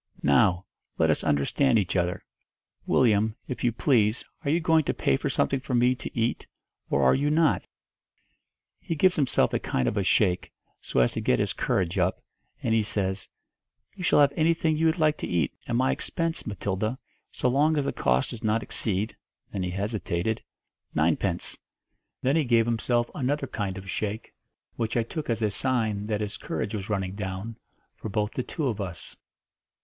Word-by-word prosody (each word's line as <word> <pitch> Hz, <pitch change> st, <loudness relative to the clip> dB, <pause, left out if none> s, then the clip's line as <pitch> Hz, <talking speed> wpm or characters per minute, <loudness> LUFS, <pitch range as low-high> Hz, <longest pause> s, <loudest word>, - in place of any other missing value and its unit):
'Now, 85 Hz, +6 st, +4 dB, 0.3 s
let -, -, +4 dB
us -, -, -1 dB
understand 115 Hz, -, +2 dB
each 95 Hz, -3 st, 0 dB
other. 90 Hz, -1 st, 0 dB, 0.6 s
Willyum, 110 Hz, -3 st, +3 dB
if 125 Hz, -, -5 dB
you 120 Hz, -, +3 dB
please, 115 Hz, -2 st, +2 dB, 0.2 s
are 140 Hz, -, -1 dB
you 160 Hz, +4 st, +3 dB
going 160 Hz, -1 st, +3 dB
to -, -, -1 dB
pay 70 Hz, -, +2 dB
for -, -, -2 dB
something 135 Hz, -, +1 dB
for 130 Hz, 0 st, -3 dB
me 125 Hz, +1 st, +4 dB
to 120 Hz, -1 st, -6 dB
eat, 115 Hz, +1 st, -1 dB, 0.4 s
or 70 Hz, -, +2 dB
are 65 Hz, -, +6 dB
you 145 Hz, +2 st, +1 dB
not?' 155 Hz, 0 st, +2 dB, 1.1 s
He 165 Hz, -, -3 dB
gives 185 Hz, +4 st, +4 dB
himself 140 Hz, -4 st, +2 dB
a -, -, +2 dB
kind 65 Hz, -, -1 dB
of 105 Hz, -, -1 dB
a 100 Hz, -, +2 dB
shake, 90 Hz, -1 st, +2 dB, 0.3 s
so 65 Hz, -, +1 dB
as -, -, +2 dB
to -, -, -2 dB
get 60 Hz, -, +2 dB
his -, -, 0 dB
courage 90 Hz, +1 st, 0 dB
up, 90 Hz, +1 st, +1 dB, 0.4 s
and 115 Hz, -, +1 dB
he 115 Hz, -, +4 dB
says, 95 Hz, -2 st, -2 dB, 0.6 s
'You 190 Hz, -, -8 dB
shall 150 Hz, -, +5 dB
have 140 Hz, -1 st, +4 dB
anything 160 Hz, 0 st, +2 dB
you 160 Hz, +1 st, +3 dB
like 155 Hz, -2 st, +1 dB
to -, -, -4 dB
eat, 85 Hz, -5 st, 0 dB
at 120 Hz, -, -1 dB
my 130 Hz, +2 st, +3 dB
expense, 165 Hz, -4 st, -3 dB
Matilda, 105 Hz, +3 st, -2 dB, 0.3 s
so -, -, -1 dB
long 150 Hz, +5 st, +3 dB
as 145 Hz, -, +1 dB
the -, -, -1 dB
cost 65 Hz, 0 st, +1 dB
does 115 Hz, -, -8 dB
not 110 Hz, 0 st, +1 dB
exceed' 105 Hz, +1 st, -2 dB, 0.4 s
then 95 Hz, -, -2 dB
he 90 Hz, -, -1 dB
hesitated 100 Hz, 0 st, -2 dB, 0.5 s
'ninepence.' -, -, 0 dB, 0.6 s
Then 135 Hz, +3 st, +3 dB
he 160 Hz, -, +3 dB
gave 115 Hz, -3 st, +3 dB
himself 120 Hz, +1 st, 0 dB
another 140 Hz, +1 st, -1 dB
kind 100 Hz, -6 st, -3 dB
of 95 Hz, 0 st, -9 dB
shake, 105 Hz, +2 st, -4 dB, 0.4 s
which 115 Hz, 0 st, -1 dB
I 115 Hz, -, +3 dB
took 150 Hz, +6 st, -6 dB
as 115 Hz, -1 st, 0 dB
a 105 Hz, -, +2 dB
sign 110 Hz, -4 st, 0 dB
that 105 Hz, -1 st, -1 dB
his 105 Hz, -1 st, -4 dB
courage 105 Hz, -1 st, -4 dB
was 100 Hz, -1 st, -4 dB
running 95 Hz, -3 st, -1 dB
down, 100 Hz, +2 st, -5 dB, 0.4 s
'for 110 Hz, -, -6 dB
both 105 Hz, 0 st, -1 dB
the -, -, -2 dB
two 150 Hz, +4 st, -4 dB
of 110 Hz, -4 st, -2 dB
us.' 90 Hz, -4 st, -6 dB
110 Hz, 185 wpm, -27 LUFS, 95-135 Hz, 1.1 s, are